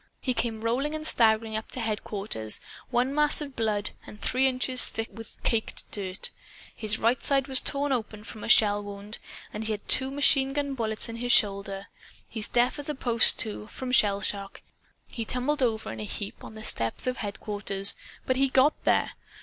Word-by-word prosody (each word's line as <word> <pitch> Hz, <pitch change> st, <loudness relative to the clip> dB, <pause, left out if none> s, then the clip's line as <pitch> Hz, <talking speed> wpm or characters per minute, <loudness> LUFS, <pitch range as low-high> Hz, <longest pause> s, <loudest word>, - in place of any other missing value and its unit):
He 255 Hz, -, -2 dB
came 225 Hz, -2 st, -2 dB
rolling 265 Hz, +7 st, -1 dB
and 310 Hz, 0 st, -6 dB
staggering 220 Hz, -5 st, +2 dB
up 220 Hz, -, -5 dB
to -, -, -4 dB
headquarters 210 Hz, -, -1 dB, 0.3 s
one 250 Hz, +2 st, 0 dB
mass 300 Hz, 0 st, +4 dB
of 285 Hz, -3 st, -7 dB
blood, 210 Hz, -2 st, -1 dB, 0.2 s
and 210 Hz, -, -12 dB
three 260 Hz, +1 st, +1 dB
inches 255 Hz, 0 st, +1 dB
thick 225 Hz, 0 st, -5 dB
with 225 Hz, -1 st, -12 dB
caked 225 Hz, -2 st, -1 dB
dirt. 195 Hz, -2 st, -3 dB, 0.4 s
His 220 Hz, 0 st, 0 dB
right 235 Hz, +2 st, +1 dB
side 275 Hz, -1 st, +1 dB
was 265 Hz, -1 st, +5 dB
torn 285 Hz, 0 st, +1 dB
open 220 Hz, -4 st, -3 dB
from 215 Hz, -1 st, -10 dB
a -, -, -5 dB
shell 205 Hz, -1 st, +5 dB
wound, 205 Hz, +1 st, -7 dB, 0.3 s
and 215 Hz, -, -5 dB
he 220 Hz, -, -1 dB
had 210 Hz, -, -8 dB
two 265 Hz, 0 st, +3 dB
machine 270 Hz, -1 st, +3 dB
gun 285 Hz, -1 st, -2 dB
bullets 220 Hz, -3 st, -1 dB
in 230 Hz, 0 st, -7 dB
his 245 Hz, +1 st, -2 dB
shoulder. 195 Hz, -2 st, +1 dB, 0.4 s
He's 220 Hz, -2 st, 0 dB
deaf 245 Hz, +4 st, +1 dB
as 290 Hz, -, -4 dB
a 300 Hz, -, -2 dB
post, 235 Hz, -3 st, +6 dB
too, 210 Hz, -1 st, -1 dB
from 255 Hz, +2 st, -6 dB
shell 205 Hz, -5 st, +4 dB
shock. 200 Hz, -1 st, -3 dB, 0.5 s
He 230 Hz, -, -4 dB
tumbled 255 Hz, +6 st, -2 dB
over 225 Hz, -3 st, -1 dB
in 110 Hz, -, -8 dB
a -, -, -4 dB
heap 200 Hz, -, -6 dB
on -, -, -11 dB
the 215 Hz, -, -9 dB
steps 115 Hz, -, +1 dB
of 255 Hz, 0 st, -1 dB
headquarters. 200 Hz, -1 st, +2 dB, 0.3 s
But 260 Hz, -, 0 dB
he 275 Hz, +1 st, +3 dB
GOT 265 Hz, +3 st, +4 dB
there. -, -, +2 dB
225 Hz, 195 wpm, -26 LUFS, 210-260 Hz, 0.5 s, post